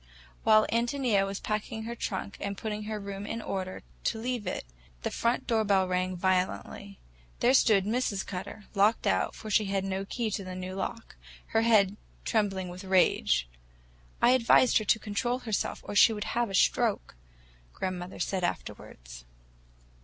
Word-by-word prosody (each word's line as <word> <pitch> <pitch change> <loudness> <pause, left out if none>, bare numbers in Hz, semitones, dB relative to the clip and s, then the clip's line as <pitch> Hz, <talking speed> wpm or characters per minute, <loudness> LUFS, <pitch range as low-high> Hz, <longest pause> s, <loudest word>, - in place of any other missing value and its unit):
While 215 -1 +6
Ántonia 235 -4 +1
was 195 0 -4
packing 220 +1 -3
her 235 +1 -4
trunk 200 -3 -4
and 200 0 -4
putting 210 -1 -4
her 215 0 -3
room 200 0 -6
in 230 - -3
order, 190 -4 -4 0.2
to 225 - +1
leave 235 -3 -3
it, - - -3 0.4
the - - -1
front 235 +2 0
door 225 -2 +2
bell 195 -2 +3
rang 185 0 -1
violently. 185 +2 -1 0.4
There 245 +2 +4
stood 215 -7 +5
Mrs. 215 -3 -1
Cutter,—locked 200 +3 -1
out, - - +1
for 215 - -7
she 215 0 +3
had 195 -1 -1
no 195 0 -2
key 225 +1 -2
to 200 - -3
the 185 0 -7
new 185 0 -5
lock—her 225 +2 -4
head 210 -3 +4 0.3
trembling 195 -5 0
with 180 +2 -8
rage. 180 - +3 0.8
"I 240 - +7
advised 255 0 +5
her 215 - -5
to 220 - +4
control 220 +4 -1
herself, 225 -5 -2
or - - -6
she 225 +2 +7
would 210 0 -4
have 235 -1 +1
a 195 - -3
stroke," - - +2 0.6
grandmother 185 - -5
said 190 -2 -2
afterwards. - - -5
205 Hz, 160 wpm, -29 LUFS, 190-225 Hz, 0.8 s, I